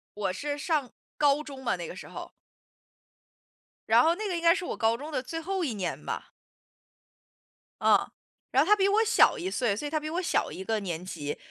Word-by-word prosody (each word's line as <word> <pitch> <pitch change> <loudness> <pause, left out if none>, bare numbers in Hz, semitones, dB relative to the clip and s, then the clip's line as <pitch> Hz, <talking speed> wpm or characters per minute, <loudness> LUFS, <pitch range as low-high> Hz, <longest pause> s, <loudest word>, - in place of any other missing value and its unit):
我 205 -3 -1
是 290 +8 -3
上 295 -5 0 0.3
高 290 0 +3
中 275 -3 -9
嘛， 240 - +1
那 175 -2 -6
个 - - -8
时 - - -9
候。 - - -8 1.6
然 - - +6
后 330 +1 +3
那 425 +3 -3
个 370 - -1
应 335 - -2
该 335 0 +6
是 360 - -4
我 - - -4
高 225 +1 +2
中 295 +5 -8
的 285 - -1
最 325 +6 -5
后 380 +2 -2
一 270 -8 -1
年 195 -4 -4
吧。 - - -4 1.5
嗯， - - +6 0.5
然 270 - +5
后 335 - -4
他 420 - +8
比 390 -1 +2
我 420 +3 +4
小 450 - +5
1 365 - -3
岁， 240 - 0
所 295 +8 -4
以 - - -7
他 310 - +1
比 305 0 -5
我 340 +3 -1
小 360 - 0
1 190 - -6
个 220 +2 0
年 175 -4 -4
级。 150 -5 -5
290 Hz, 225 characters per minute, -28 LUFS, 220-340 Hz, 1.6 s, 他